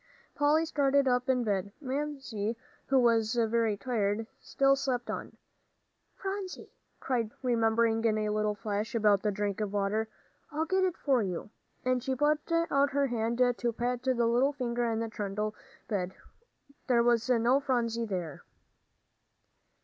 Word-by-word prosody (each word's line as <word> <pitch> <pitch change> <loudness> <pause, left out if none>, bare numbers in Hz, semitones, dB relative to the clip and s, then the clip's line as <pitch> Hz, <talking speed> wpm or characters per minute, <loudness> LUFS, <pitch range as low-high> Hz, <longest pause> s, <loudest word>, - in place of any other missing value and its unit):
Polly 300 +2 +3
started 280 -3 +2
up 250 +1 +1
in 250 -2 +2
bed. 200 -2 -1
Mamsie, 270 -6 -3 0.3
who 270 - +3
was 230 -2 +3
very 225 -2 +1
tired, 210 -1 -1
still 275 0 +2
slept 255 -3 -2
on. - - -6 0.8
"Phronsie," 385 -1 -5 0.3
cried 235 -4 -1
Polly, 250 +2 -2
remembering 225 0 +2
in 215 -1 +3
a 210 0 0
flash 210 +3 -3
about 210 -3 +4
the 210 - +1
drink 205 0 -2
of 210 -2 -2
water, 205 +2 0 0.4
"I'll 315 +1 -1
get 375 +3 +1
it 365 -2 -2
for 265 -4 +2
you," 190 +1 -4 0.3
and 255 0 +2
she 260 +1 -1
put 300 +4 +1
out 285 -5 +2
her 280 0 +2
hand 235 -2 -1 0.2
to 240 - 0
pat 245 +1 -2
the 260 0 +1
little 245 +5 +3
figure 240 -3 -1
in 225 0 -1
the 230 - -2
trundle 210 0 -3 0.3
bed. 190 -4 -2 0.7
There 240 -3 +4
was 235 0 +2
no 245 +2 +4
Phronsie 235 -4 0
there! 180 -8 -4
235 Hz, 150 wpm, -30 LUFS, 215-270 Hz, 0.8 s, about